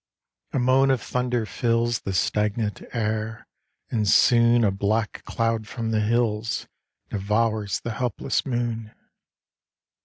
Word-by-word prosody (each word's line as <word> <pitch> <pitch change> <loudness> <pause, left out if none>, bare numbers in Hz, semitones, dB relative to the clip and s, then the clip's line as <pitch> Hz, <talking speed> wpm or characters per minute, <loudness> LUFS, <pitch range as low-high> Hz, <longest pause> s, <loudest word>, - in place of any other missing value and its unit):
A - - -1
moan 130 +2 +4
of 130 -2 +3
thunder 125 -2 -1
fills 115 +1 0
The 95 - -4
stagnant 105 +3 0
air; 110 -1 -2 0.5
and 105 -3 +1
soon 120 +1 +5
A 105 - +3
black 105 +2 -1
cloud 115 -1 -1
from 115 -1 -3
the 110 -1 +2
hills 110 0 0 0.5
Devours 105 +1 0
the 120 - -4
helpless 120 0 -1
moon. 120 -4 -3
115 Hz, 120 wpm, -24 LUFS, 105-120 Hz, 0.5 s, soon